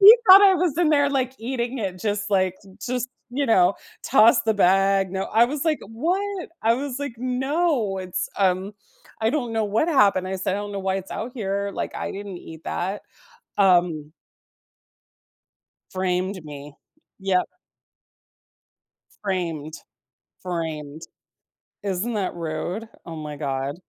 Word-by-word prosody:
He 420 +4 +11
thought 385 +2 +11
I 390 -1 +7
was 340 -4 0
in 345 -3 +4
there, 285 -2 +3
like, 260 -2 0
eating 245 +2 -3
it 190 -4 -4
just, 205 0 -2
like 185 -2 +2 0.3
just, 250 0 -2 0.2
you 275 +3 -1
know, 185 -4 +4 0.3
toss 225 +2 +5
the 220 -1 +1
bag, 195 0 +3
no, 190 0 -1
I 225 +2 +4
was 285 +3 -3
like, 315 -2 +2
"What?" 360 - -2
I 225 +1 +4
was 270 0 -4
like, 285 -4 -4
"No, 255 - 0
it's, 185 -1 -3
um 190 +1 +1 0.5
I 220 +1 +2
don't 250 -6 -2
know 220 -1 +1
what 215 +10 +1
happened." 200 - +3
I 190 - -2
said, 190 0 -1
"I - - -2
don't 205 0 -5
know 200 - -3
why 190 0 -1
it's 195 -1 -7
out 240 +3 -5
here, 200 -3 -2
like, - - -4
I - - -4
didn't 200 -2 -7
eat 160 -1 -11
that." 195 +3 -3 0.6
Um. 175 -6 +3 1.8
Framed 185 -1 -1
me. 145 -1 -9 0.5
Yep. 190 -2 +1 1.8
Framed. 165 -6 -2 0.7
Framed. 160 -4 -4 0.8
Isn't 200 +4 -2
that 200 -4 -1
rude? 170 +6 -4 0.2
Oh 165 - -7
my 150 -2 -6
god. 135 -1 -2
200 Hz, 150 wpm, -24 LUFS, 180-250 Hz, 1.8 s, He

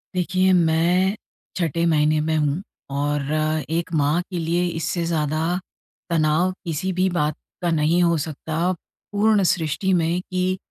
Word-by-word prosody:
देखिए 185 +1 +2
मैं 175 +4 +3 0.4
छठे 170 -1 0
महीने 155 -1 +3
में 160 - +1
हूँ। 150 +3 0 0.4
और 145 0 0 0.5
एक 170 +2 -1
माँ 150 +4 +2
के 180 -2 -3
लिए 170 +2 0
इससे 165 +2 -1
ज़्यादा 160 +2 0 0.5
तनाव 165 +2 +2
किसी 170 +3 -2
भी 185 +1 +2
बात 150 -4 0 0.3
का 175 - 0
नहीं 160 +3 +2
हो 170 -1 +3
सकता 160 +3 -2 0.4
पूर्ण 210 -1 +3
सृष्टि 165 +3 0
में 170 +1 +1
कि 185 0 0
170 Hz, 140 wpm, -22 LUFS, 155-180 Hz, 0.5 s, मैं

